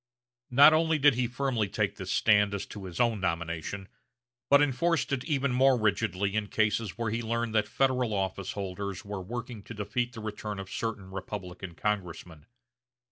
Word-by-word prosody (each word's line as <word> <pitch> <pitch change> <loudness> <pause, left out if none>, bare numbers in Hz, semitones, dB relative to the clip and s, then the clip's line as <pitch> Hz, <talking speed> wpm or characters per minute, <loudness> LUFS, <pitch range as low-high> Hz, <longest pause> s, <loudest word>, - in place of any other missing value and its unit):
Not 140 +5 +8
only 160 0 +3
did 145 -1 +5
he 125 0 0
firmly 125 -3 -1
take 100 0 -1
this 95 -2 -5
stand 105 -2 +4
as 100 - -4
to 100 -2 -9
his 90 +2 -7
own 120 -3 +2
nomination, 85 +2 -3 0.6
but 140 - +7
enforced 145 +4 +1
it 130 -2 -1
even 140 -3 0
more 130 +1 +4
rigidly 100 -2 0
in 110 -1 0
cases 110 0 0
where 115 -3 -1
he 115 +2 -1
learned 115 0 -2
that 105 -1 +2
Federal 130 -3 +1
office 95 -1 -2
holders 100 -1 -5
were 100 -1 -5
working 120 +3 -6
to 115 - -10
defeat 110 +4 -2
the 115 - -8
return 105 -1 -5
of 95 -1 -7
certain 105 -4 -4
Republican 95 -2 -7
congressmen. 90 -6 -4
105 Hz, 175 wpm, -29 LUFS, 95-125 Hz, 0.6 s, Not